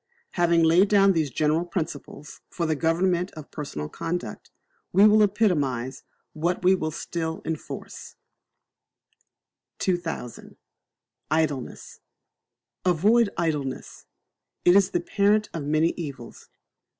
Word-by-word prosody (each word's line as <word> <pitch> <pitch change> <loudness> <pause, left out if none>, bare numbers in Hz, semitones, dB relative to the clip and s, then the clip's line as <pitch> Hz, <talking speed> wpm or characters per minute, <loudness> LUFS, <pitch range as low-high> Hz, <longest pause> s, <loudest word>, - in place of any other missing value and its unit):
Having 170 -1 +2
laid 175 +5 +5
down 195 -1 +5
these 160 -4 0
General 155 +5 +1
Principles 160 -4 -6
for 170 - -3
the 160 -1 0
government 175 +3 +1
of 155 -2 -10
personal 105 - -5
conduct, 175 - -5 0.4
we 200 +2 +6
will 215 0 +6
epitomize 150 - 0 0.3
what 170 +4 -2
we 185 +1 +5
would 155 -4 -2
still 160 0 -4
enforce: 160 -2 -7 1.6
2000. 175 -9 -4 0.7
Idleness. 155 -4 -2 0.8
Avoid 205 +6 +3
Idleness. 150 -6 -3 0.6
It 175 - +6
is 200 -1 +5
the 175 - -1
parent 210 +3 +1
of 155 -4 -4
many 155 +3 +2
evils. 140 -8 -8
165 Hz, 110 wpm, -25 LUFS, 150-185 Hz, 1.6 s, we